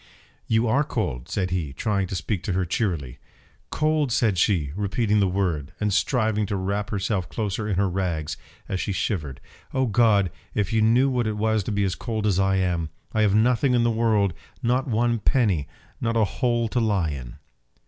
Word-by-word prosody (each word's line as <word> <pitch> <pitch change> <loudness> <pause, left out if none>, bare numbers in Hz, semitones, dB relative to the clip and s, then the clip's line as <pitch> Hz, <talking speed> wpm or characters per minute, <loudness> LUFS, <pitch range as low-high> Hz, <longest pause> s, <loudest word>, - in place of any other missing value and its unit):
"You 115 +1 +2
are 135 +6 +3
cold!" 65 - -3
said 95 -2 -1
he, 80 -7 -2
trying 100 - -1
to 95 - -4
speak 95 0 -2
to 95 - -1
her 95 0 0
cheerily. 85 - -2 0.5
"Cold!" 155 -3 +1
said 105 -6 +2
she, 85 -8 +2
repeating 105 +1 +1
the 100 - +3
word, 90 -7 -1
and 105 -1 0
striving 110 -2 +1
to 100 - -2
wrap 100 +2 -2
herself 95 -2 -1
closer 105 -1 -2
in 100 - 0
her 100 +2 +2
rags, 85 -5 -2 0.3
as 95 - -2
she 100 - -2
shivered 85 - -2 0.4
"Oh 130 0 +2
God! 105 -5 +3 0.2
if 105 0 0
you 110 - +3
knew 120 +5 +4
what 125 -4 0
it 105 -1 -2
was 110 -1 +1
to - - -2
be 100 -1 +1
as 95 -2 0
cold 110 -1 -3
as 100 -3 +2
I 95 0 +2
am! 90 -4 0 0.2
I 110 - +2
have 105 -2 +3
nothing 125 +3 +3
in 120 - +3
the 120 - +3
world, 110 -5 +2 0.3
not 125 +4 +1
one 120 0 +1
penny, 105 - +1 0.3
not 115 -1 0
a 110 - +4
hole 120 +2 0
to 120 - 0
lie 100 -8 +1
in!" 65 -4 -7
105 Hz, 200 wpm, -24 LUFS, 95-115 Hz, 0.5 s, knew